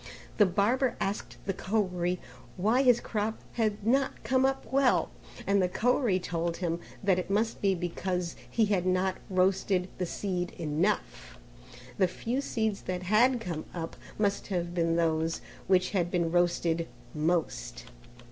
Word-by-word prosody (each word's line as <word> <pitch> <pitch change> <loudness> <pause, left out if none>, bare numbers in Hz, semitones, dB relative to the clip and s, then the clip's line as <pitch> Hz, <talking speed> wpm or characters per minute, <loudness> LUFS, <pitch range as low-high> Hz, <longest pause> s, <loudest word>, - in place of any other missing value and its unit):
The 210 - +6
barber 235 +7 +1
asked 200 +2 -3
the 195 - 0
Koeri 180 -3 0 0.4
why 220 +8 +3
his 245 -3 +5
crop 215 0 -2
had 215 -3 -1
not 270 +4 +1
come 260 0 +3
up 270 0 -2
well, 275 -2 +3 0.3
and 200 0 +3
the 180 - +2
Koeri 235 -1 +2
told 170 -1 -2
him 170 -2 -1 0.2
that 190 -2 +3
it 180 - -4
must 215 +3 0
be 195 -1 +3
because 175 0 -2
he 225 - +3
had 190 -3 +1
not 185 +1 +1
roasted 185 0 +2
the 180 - -1
seed 180 -1 -3
enough; 150 - -1 0.6
the 190 - +5
few 235 +8 -2
seeds 220 -6 -1
that 180 0 -2
had 235 +7 +4
come 170 -8 -4
up 165 -1 -4 0.2
must 200 -1 0
have 175 -3 -2
been 165 -1 +1
those 165 -1 +1 0.3
which 185 -1 +3
had 175 -4 +1
been 170 -2 0
roasted 170 -1 +1 0.3
most. 150 - -1
185 Hz, 150 wpm, -29 LUFS, 175-215 Hz, 0.6 s, The